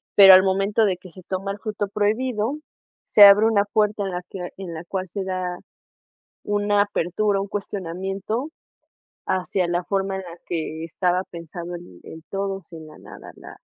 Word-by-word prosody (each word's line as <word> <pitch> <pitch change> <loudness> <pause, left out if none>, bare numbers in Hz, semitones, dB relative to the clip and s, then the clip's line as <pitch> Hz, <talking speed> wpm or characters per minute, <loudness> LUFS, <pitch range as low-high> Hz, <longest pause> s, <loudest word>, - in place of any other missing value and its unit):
Pero 195 -2 +10
al 185 - +9
momento 195 +3 +2
de 190 -3 0
que 185 0 -14
se 185 - -12
toma 190 +2 -4
el 200 - -7
fruto 210 -1 -3
prohibido, 220 +4 0 0.5
se 210 - +2
abre 200 +2 +8
una 210 -3 +3
puerta 210 0 0
en - - -2
la 180 0 -3
que 190 - -8 0.2
en 190 -2 -7 0.2
cual 190 -1 -3
se 195 +3 -4
da 185 -1 -3 0.8
una 205 0 +1
apertura, 205 +1 0
un 195 - -3
cuestionamiento 195 - -4 0.8
hacia 185 -1 0
la 175 +1 -1
forma 195 +1 -1
en 190 - -4
la 175 -1 -10
que 160 -1 -4
estaba 180 +2 0
pensado 170 +1 -7
el 170 - -12
el 160 0 -11
todos, 195 -2 -4
en 160 -1 -9
la 155 - -14
nada, - - -12
la - - -12
195 Hz, 175 wpm, -23 LUFS, 180-205 Hz, 0.8 s, Pero